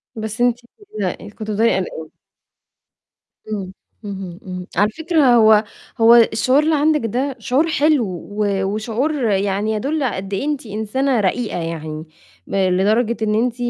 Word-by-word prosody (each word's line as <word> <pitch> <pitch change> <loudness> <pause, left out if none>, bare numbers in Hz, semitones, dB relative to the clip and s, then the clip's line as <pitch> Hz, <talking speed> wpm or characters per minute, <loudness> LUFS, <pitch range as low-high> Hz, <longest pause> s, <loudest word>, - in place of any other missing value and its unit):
بس 220 +2 -5
أنتِ 245 0 +2 0.2
بتقلقي، 205 - -5
كنتِ 215 +1 -7
بتفضلي 225 +3 +2
قلقانة. 160 -4 -5 1.4
امم، 190 -2 -5 0.3
اهم، 190 -3 -7
امم. 180 -1 -6
على 205 +2 +4
فكرة 310 -3 +2
هو 220 -1 +6 0.4
هو 230 +1 +8
الشعور 240 +5 +4
اللي 315 0 +2
عندِك 300 0 +2
ده 255 +5 -2
شعور 265 +8 +1
حلو، 300 -5 +2 0.3
و 205 -2 0
وشعور 220 +9 -1 0.2
يعني 200 +2 0
يدل 280 +7 -1
على 245 - -1
قد 195 +1 -6
إيه 195 - -1
أنتِ 295 -5 -2
إنسانة 220 +5 -1
رقيقة 210 +1 -1
يعني، 160 -1 -5 0.4
لدرجة 200 +5 +1
إن 215 -1 +1
أنتِ 235 +1 +1
220 Hz, 145 wpm, -19 LUFS, 195-255 Hz, 1.4 s, هو